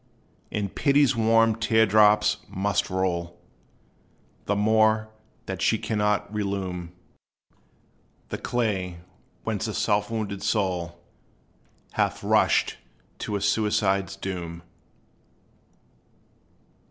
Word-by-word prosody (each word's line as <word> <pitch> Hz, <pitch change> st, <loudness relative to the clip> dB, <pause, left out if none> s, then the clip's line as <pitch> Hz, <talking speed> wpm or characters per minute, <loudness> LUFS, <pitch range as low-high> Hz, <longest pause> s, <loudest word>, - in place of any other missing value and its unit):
And 100 Hz, -2 st, -3 dB
Pity's 140 Hz, -2 st, +3 dB
warm 115 Hz, 0 st, +3 dB
tear 110 Hz, -1 st, +3 dB
drops 105 Hz, 0 st, +4 dB
must 100 Hz, +1 st, -1 dB
roll 85 Hz, -2 st, -2 dB, 1.1 s
The 105 Hz, -, 0 dB
more, 110 Hz, +1 st, +3 dB, 0.4 s
that -, -, -5 dB
she -, -, +3 dB
cannot 105 Hz, -1 st, -1 dB
relume 95 Hz, -4 st, -3 dB, 1.4 s
The -, -, -4 dB
clay 95 Hz, -8 st, -2 dB, 0.4 s
whence 110 Hz, -2 st, -2 dB
the 110 Hz, -, -4 dB
self 105 Hz, -1 st, +1 dB
wounded 105 Hz, -3 st, -3 dB
soul 90 Hz, -5 st, -1 dB, 0.9 s
Hath -, -, -1 dB
rushed -, -, +2 dB, 0.4 s
to 105 Hz, -, -3 dB
a 100 Hz, -, -2 dB
suicide's 100 Hz, -3 st, +1 dB
doom. 85 Hz, -3 st, -6 dB
105 Hz, 90 wpm, -25 LUFS, 95-110 Hz, 1.4 s, drops